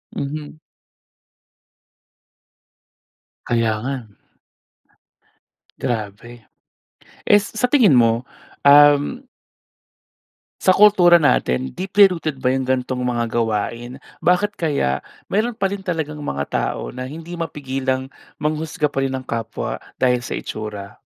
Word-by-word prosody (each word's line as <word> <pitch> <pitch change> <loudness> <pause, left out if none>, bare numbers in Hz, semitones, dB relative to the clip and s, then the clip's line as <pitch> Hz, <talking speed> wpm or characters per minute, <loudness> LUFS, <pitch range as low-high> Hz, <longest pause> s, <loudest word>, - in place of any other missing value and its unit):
Mhm. 150 +2 -5 2.9
Kaya 115 -2 +1
nga. 135 - -2 1.9
Grabe. 115 0 -5 0.8
Eh 205 - +6
s 205 - -7
sa 225 +3 0
tingin 235 - +5
mo, 115 0 +3 0.4
um 145 - +5 1.4
Sa 185 - +5
kultura 190 -4 +7
natin, 65 - +1
deeply 195 +2 +4
rooted 155 -5 -3
ba 130 0 0
yung 130 0 -1
ganitong 130 -1 -1
mga 120 -1 -1
gawain? 115 +2 -2 0.2
Bakit 190 +4 +2
kaya, 140 - -1 0.3
mayroon 220 +3 0
pa 195 - 0
rin 200 -1 -4
talagang 160 -5 -4
mga 70 - -3
tao - - -3
na 130 +1 -6
hindi 165 +3 -9
mapigilang 135 -5 -3 0.3
manghusga 155 0 -2
pa 135 - -1
rin 135 0 -1
ng 130 - -9
kapwa, 115 -2 -4 0.2
dahil 125 -1 +2
sa - - -4
itsura? 105 -2 -7
135 Hz, 110 wpm, -20 LUFS, 120-170 Hz, 2.9 s, kultura